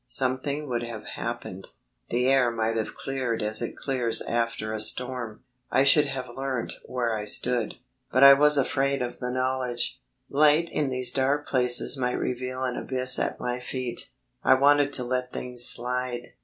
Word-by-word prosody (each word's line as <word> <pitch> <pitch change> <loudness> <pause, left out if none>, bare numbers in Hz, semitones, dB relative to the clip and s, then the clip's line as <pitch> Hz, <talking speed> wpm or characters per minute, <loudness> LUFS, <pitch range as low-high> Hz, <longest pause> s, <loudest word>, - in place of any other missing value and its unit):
Something 130 - -2
would 120 -2 -2
have 115 -3 -7
happened; 95 +1 -6 0.4
the 125 +2 0
air 135 -2 +3
might 115 -1 -2
have 110 -1 -3
cleared 130 -5 -3
as 110 +2 +1
it 120 - -4
clears 125 -4 0
after 115 -2 -2
a 110 - -3
storm; 120 0 -2 0.3
I 135 - +3
should 145 +2 +4
have 135 -2 -5
learnt 135 -3 -3
where 120 -3 -2
I 105 -1 -4
stood. 115 +1 -1 0.4
But 130 - +3
I 140 0 +11
was 150 +1 +5
afraid 140 0 0
of 120 - -6
the 125 - -4
knowledge. 130 -1 -2 0.3
Light 150 +3 +3
in 145 -3 -1
these 130 -1 -1
dark 140 +3 0
places 125 +1 +2
might 125 -1 -1
reveal 130 +1 -4
an 125 -1 -2
abyss 130 -1 +4
at - - -2
my 125 0 -3
feet. 125 -1 -4 0.3
I 130 - +5
wanted 145 +1 +3
to 125 - +1
let 125 0 -3
things 125 -1 +2
slide. 125 0 +1
125 Hz, 170 wpm, -26 LUFS, 120-135 Hz, 0.4 s, I